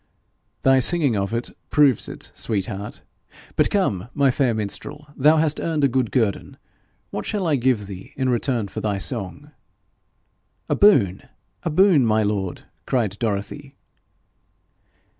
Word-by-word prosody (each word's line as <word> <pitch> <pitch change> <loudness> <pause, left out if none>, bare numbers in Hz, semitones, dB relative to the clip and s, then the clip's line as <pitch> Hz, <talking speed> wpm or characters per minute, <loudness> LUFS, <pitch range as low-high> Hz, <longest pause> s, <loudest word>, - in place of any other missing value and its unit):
'Thy 135 0 +5
singing 145 -2 +2
of 100 0 -1
it 115 +1 -2 0.2
proves 145 -6 +3
it, - - -7
sweet 100 -4 -1
heart. 100 +2 -6 0.5
But - - +3
come, 120 - 0
my 140 -2 +3
fair 125 -3 +1
minstrel, 110 +7 -4
thou 150 +4 +4
hast 155 -1 +1
earned 155 -3 -1
a - - +6
good 130 -3 0
guerdon: 110 -6 -1 0.5
what 105 - -4
shall 205 -4 -2
I 155 -3 +2
give 125 -5 +1
thee 95 -1 -10
in 130 -1 0
return 120 -3 0
for - - -6
thy 105 -2 -1
song?' 120 +7 -4 1.2
'A - - +2
boon, 110 - +4 0.4
a - - -2
boon, 170 -3 +4
my 110 -1 +2
lord!' 100 -3 -2 0.2
cried 115 -7 0
Dorothy. 115 +6 -4
125 Hz, 145 wpm, -22 LUFS, 105-145 Hz, 1.2 s, a